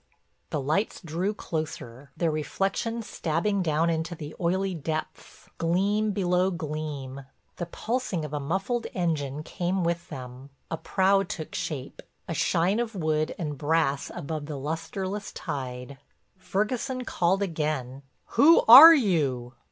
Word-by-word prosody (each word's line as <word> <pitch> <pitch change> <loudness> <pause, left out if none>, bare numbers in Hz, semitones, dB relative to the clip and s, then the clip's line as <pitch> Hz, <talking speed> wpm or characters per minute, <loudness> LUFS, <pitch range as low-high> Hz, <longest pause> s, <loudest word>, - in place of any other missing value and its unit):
The 150 - -2
lights 155 +10 -1
drew 170 +5 -1
closer, 145 - -5
their 165 -2 +1
reflections 195 +9 -2
stabbing 190 +5 -1
down 165 0 +1
into 165 +2 -2
the 150 -2 -8
oily 185 +2 0
depths, 155 -1 -6
gleam 200 +6 +1
below 180 -1 +1
gleam. 150 -5 -5 0.3
The 175 - -4
pulsing 215 -4 -2
of 150 - -8
a 150 - -1
muffled 195 - -2
engine 150 -5 -1
came 180 +3 -2
with 170 0 -2
them, 130 +1 -9 0.2
a 165 - -1
prow 195 +3 +2
took 170 -4 -6
shape, 140 -4 -5 0.3
a 170 - -3
shine 180 +6 +1
of 235 -2 -3
wood 155 -3 0
and 150 -5 -4
brass 150 -2 +1
above 155 -2 -5
the 150 -2 -5
lusterless 185 +7 -4
tide. 135 -3 -6 0.4
Ferguson 245 +7 -2
called 190 0 +1
again: 150 -7 -3 0.3
"Who 325 +4 +6
are 295 +8 +12
you?" 140 - 0
165 Hz, 135 wpm, -27 LUFS, 150-195 Hz, 0.4 s, are